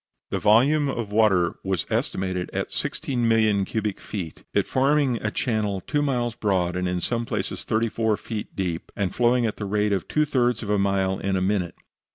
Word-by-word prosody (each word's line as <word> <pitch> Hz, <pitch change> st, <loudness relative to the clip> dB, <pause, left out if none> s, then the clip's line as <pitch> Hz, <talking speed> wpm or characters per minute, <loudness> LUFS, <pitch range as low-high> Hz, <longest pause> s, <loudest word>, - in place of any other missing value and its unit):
The -, -, 0 dB
volume 135 Hz, +8 st, +4 dB
of 115 Hz, -6 st, -3 dB
water 105 Hz, -5 st, +3 dB
was 95 Hz, -5 st, -1 dB
estimated 95 Hz, -1 st, -1 dB
at -, -, -2 dB
16,000,000 115 Hz, -6 st, +1 dB
cubic 105 Hz, -3 st, -2 dB
feet, 90 Hz, -6 st, -6 dB
it -, -, +2 dB
forming 135 Hz, -1 st, +2 dB
a 105 Hz, -, 0 dB
channel 105 Hz, -3 st, -1 dB
two 145 Hz, +10 st, -1 dB
miles 125 Hz, -5 st, 0 dB
broad 95 Hz, -5 st, 0 dB
and 90 Hz, 0 st, -1 dB
in 90 Hz, 0 st, -1 dB
some 120 Hz, +6 st, -1 dB
places -, -, -3 dB
thirty 115 Hz, +1 st, +1 dB
four 110 Hz, -1 st, 0 dB
feet 110 Hz, -2 st, -6 dB
deep, 90 Hz, -3 st, -3 dB
and 95 Hz, -3 st, -1 dB
flowing 120 Hz, 0 st, +3 dB
at 110 Hz, -, -2 dB
the 105 Hz, -, -4 dB
rate 105 Hz, +1 st, +1 dB
of 95 Hz, -5 st, -2 dB
two 150 Hz, 0 st, +2 dB
thirds 125 Hz, -5 st, +1 dB
of 105 Hz, -, -3 dB
a 105 Hz, -, +2 dB
mile 95 Hz, -1 st, +1 dB
in 100 Hz, -1 st, -1 dB
a -, -, +2 dB
minute. 95 Hz, -3 st, 0 dB
105 Hz, 195 wpm, -24 LUFS, 95-120 Hz, -, volume